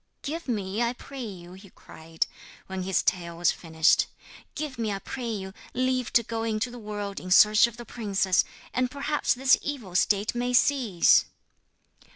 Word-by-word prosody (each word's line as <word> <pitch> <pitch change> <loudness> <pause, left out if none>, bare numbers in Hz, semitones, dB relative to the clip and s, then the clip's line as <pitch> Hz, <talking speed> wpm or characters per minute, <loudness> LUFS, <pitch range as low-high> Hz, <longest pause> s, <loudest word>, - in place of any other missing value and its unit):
'Give 320 +3 -5
me, 205 -2 -2
I 235 0 +1
pray 270 +1 -9
you,' 180 -4 -9
he 190 +1 -14
cried, 160 -1 -5 0.4
when 190 0 -5
his 185 0 0
tale 170 -2 -1
was 175 0 +3
finished, 160 -2 +2 0.5
'give 290 -5 -5
me, 220 -2 -1
I 200 - -2
pray 240 +4 -6
you, 190 -3 -5 0.2
leave 255 -1 0
to 235 - +5
go 225 0 -4
into 225 +2 -1
the 245 - -9
world 205 -2 -5
in 185 - -8
search 210 +4 +7
of 235 0 -11
the 240 - -9
princess, 195 -6 +1 0.3
and 255 0 +1
perhaps 285 +1 0
this 260 +1 +4
evil 250 -11 -5
state 200 +3 +2
may 245 +1 -1
cease.' 245 -9 +4
215 Hz, 175 wpm, -27 LUFS, 190-245 Hz, 0.5 s, search